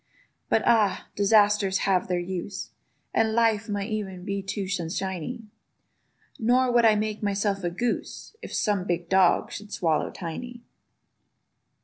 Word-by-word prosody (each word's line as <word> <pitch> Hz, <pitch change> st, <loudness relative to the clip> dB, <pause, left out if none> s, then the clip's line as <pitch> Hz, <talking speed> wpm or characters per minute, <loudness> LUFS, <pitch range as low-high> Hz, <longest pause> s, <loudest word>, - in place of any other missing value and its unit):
But -, -, +2 dB
ah! 220 Hz, -5 st, +2 dB
disasters 205 Hz, -1 st, +4 dB
have 190 Hz, -2 st, +2 dB
their 180 Hz, -1 st, 0 dB
use; 185 Hz, +2 st, -5 dB, 0.4 s
And 220 Hz, -1 st, +2 dB
life 225 Hz, -1 st, +2 dB
might 205 Hz, +1 st, -2 dB
e'en 190 Hz, -4 st, -4 dB
be 200 Hz, -1 st, -2 dB
too 195 Hz, 0 st, -4 dB
sunshiny: 190 Hz, +4 st, -3 dB, 1.0 s
Nor 250 Hz, +2 st, +3 dB
would 240 Hz, -1 st, +4 dB
I 220 Hz, -1 st, +6 dB
make 215 Hz, 0 st, -2 dB
myself 200 Hz, -1 st, -1 dB
a 175 Hz, -, 0 dB
goose, 235 Hz, -, -3 dB
If -, -, -8 dB
some 205 Hz, -4 st, 0 dB
big 175 Hz, -2 st, -2 dB
dog 190 Hz, -2 st, +3 dB
should 210 Hz, 0 st, -8 dB
swallow 160 Hz, -3 st, 0 dB
Tiny. 235 Hz, +8 st, -7 dB
200 Hz, 135 wpm, -26 LUFS, 185-220 Hz, 1.0 s, I